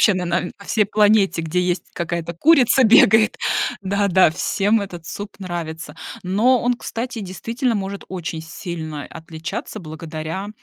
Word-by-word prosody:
вообще 210 Hz, -, +5 dB
на 180 Hz, -, -2 dB
на 175 Hz, +1 st, -1 dB
всей 215 Hz, +1 st, +2 dB
планете, 205 Hz, -3 st, +3 dB
где 165 Hz, +3 st, 0 dB
есть 180 Hz, -1 st, 0 dB
какая-то 170 Hz, 0 st, -3 dB
курица, 265 Hz, -, +5 dB
бегает. 220 Hz, 0 st, +6 dB, 0.5 s
Да, 200 Hz, +1 st, +1 dB
да, 185 Hz, -3 st, +5 dB
всем 205 Hz, +5 st, +1 dB
этот 175 Hz, -5 st, -7 dB
суп 205 Hz, +4 st, -7 dB
нравится. 170 Hz, -4 st, -5 dB, 0.3 s
Но 225 Hz, +7 st, +3 dB
он, 245 Hz, +1 st, +1 dB
кстати, 235 Hz, 0 st, -5 dB
действительно 230 Hz, +6 st, -2 dB
может 195 Hz, 0 st, -4 dB
очень 175 Hz, -3 st, -4 dB
сильно 160 Hz, -3 st, -6 dB
отличаться, 160 Hz, +5 st, -7 dB
благодаря 160 Hz, +3 st, -6 dB
185 Hz, 140 wpm, -21 LUFS, 170-215 Hz, 0.5 s, бегает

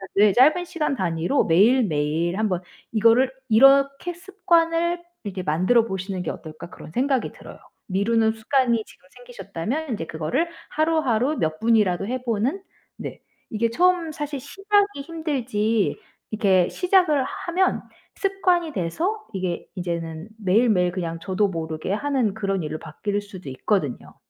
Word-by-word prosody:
네, 205 Hz, -1 st, +5 dB
짧은 305 Hz, +8 st, +5 dB
시간 305 Hz, -5 st, -2 dB
단위로 175 Hz, -, 0 dB
매일매일 170 Hz, -, +2 dB
한번 190 Hz, -5 st, 0 dB, 0.3 s
이거를 230 Hz, +4 st, +4 dB, 0.2 s
이렇게 275 Hz, +7 st, +5 dB
'습관을 345 Hz, -2 st, +1 dB, 0.2 s
이렇게 195 Hz, -2 st, -5 dB
만들어 185 Hz, +9 st, +2 dB
보시는 190 Hz, -2 st, -4 dB
게 170 Hz, -, -3 dB
어떨까?' 160 Hz, +1 st, -9 dB
그런 -, -, -12 dB
생각이 265 Hz, -, 0 dB
들어요. -, -, -12 dB, 0.3 s
미루는 220 Hz, +3 st, +2 dB
습관이 235 Hz, 0 st, +1 dB
지금 185 Hz, -, -20 dB
생기셨다면 245 Hz, -, -5 dB
인제 200 Hz, -8 st, -3 dB
그거를 165 Hz, -, -1 dB, 0.2 s
하루하루 310 Hz, -4 st, +1 dB
몇 155 Hz, 0 st, -1 dB
분이라도 210 Hz, -4 st, +2 dB
해 255 Hz, +1 st, -3 dB
보는. 245 Hz, -, -1 dB, 0.4 s
네. -, -, -7 dB, 0.3 s
이게 230 Hz, +1 st, 0 dB
처음 355 Hz, +1 st, +2 dB
사실 295 Hz, -2 st, -4 dB
시작이 400 Hz, 0 st, 0 dB
힘들지 250 Hz, -, -1 dB, 0.3 s
이렇게 195 Hz, -5 st, +3 dB
시작을 360 Hz, -7 st, +3 dB
하면 360 Hz, +6 st, -1 dB, 0.3 s
습관이 365 Hz, -5 st, +1 dB
돼서 340 Hz, -, -2 dB
이게 185 Hz, -2 st, -3 dB
이제는 170 Hz, 0 st, -4 dB
매일매일 190 Hz, -2 st, +3 dB
그냥 170 Hz, -2 st, -4 dB
저도 190 Hz, +4 st, 0 dB
모르게 165 Hz, 0 st, -4 dB
하는 255 Hz, -4 st, 0 dB
그런 195 Hz, -4 st, -2 dB
일로 155 Hz, +1 st, -4 dB
바뀔 205 Hz, +6 st, -3 dB
수도 185 Hz, -8 st, -10 dB
있거든요. 145 Hz, -, -2 dB
225 Hz, 320 characters per minute, -23 LUFS, 185-295 Hz, 0.4 s, 네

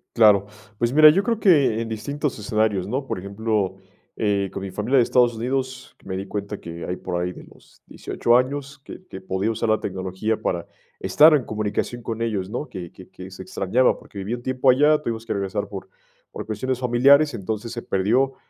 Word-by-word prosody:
Claro, 105 Hz, -4 st, +6 dB, 0.3 s
pues 120 Hz, +2 st, 0 dB
mira, 155 Hz, +1 st, +9 dB
yo 190 Hz, +6 st, +3 dB
creo 230 Hz, 0 st, -1 dB
que 140 Hz, -, +4 dB
en 115 Hz, -, -4 dB
distintos 140 Hz, +4 st, -3 dB
escenarios, 105 Hz, -3 st, 0 dB
¿no? 130 Hz, +6 st, -2 dB
Por 110 Hz, -, -4 dB
ejemplo, 100 Hz, 0 st, -2 dB, 0.4 s
eh, 100 Hz, -2 st, 0 dB
con -, -, -5 dB
mi 95 Hz, -, -5 dB
familia 105 Hz, +8 st, -1 dB
de 125 Hz, -, +6 dB
Estados 120 Hz, 0 st, +3 dB
Unidos, 130 Hz, +2 st, -4 dB
me 95 Hz, -, -4 dB
di 95 Hz, +1 st, -4 dB
cuenta 100 Hz, +1 st, -5 dB
que 85 Hz, -1 st, -8 dB
hay 90 Hz, -, -3 dB
por 90 Hz, -1 st, -4 dB
ahí 90 Hz, +1 st, -2 dB
de -, -, -12 dB
los -, -, -21 dB
18 120 Hz, +1 st, +1 dB
años, 140 Hz, +2 st, -2 dB
que 185 Hz, -, -11 dB
que 95 Hz, -, -8 dB
podía 95 Hz, +3 st, -2 dB
usar 115 Hz, +1 st, -2 dB
la 110 Hz, 0 st, +2 dB
tecnología 95 Hz, +3 st, -3 dB
para 85 Hz, -1 st, -2 dB, 0.3 s
estar 155 Hz, +2 st, +6 dB
en 145 Hz, -4 st, +3 dB
comunicación 110 Hz, +3 st, -3 dB
con 115 Hz, 0 st, -5 dB
ellos, 105 Hz, -5 st, -2 dB
¿no?, 125 Hz, +7 st, -5 dB
que 90 Hz, -2 st, -8 dB
que 95 Hz, -, -14 dB
que 90 Hz, 0 st, -10 dB
se 95 Hz, 0 st, -9 dB
extrañaba, 100 Hz, +7 st, +1 dB
porque -, -, -15 dB
viví 100 Hz, +4 st, -3 dB
un 120 Hz, -, -10 dB
tiempo 130 Hz, +1 st, +1 dB
allá, 150 Hz, +4 st, +5 dB
tuvimos 115 Hz, -4 st, -4 dB
que -, -, -2 dB
regresar 100 Hz, +1 st, -3 dB
por 100 Hz, -1 st, -8 dB, 0.4 s
por -, -, -7 dB
cuestiones 120 Hz, +4 st, -3 dB
familiares. 140 Hz, +4 st, +4 dB
Entonces, 110 Hz, +2 st, -4 dB
se 120 Hz, -, -5 dB
perdió 120 Hz, +9 st, +1 dB
110 Hz, 205 wpm, -23 LUFS, 100-130 Hz, 0.4 s, mira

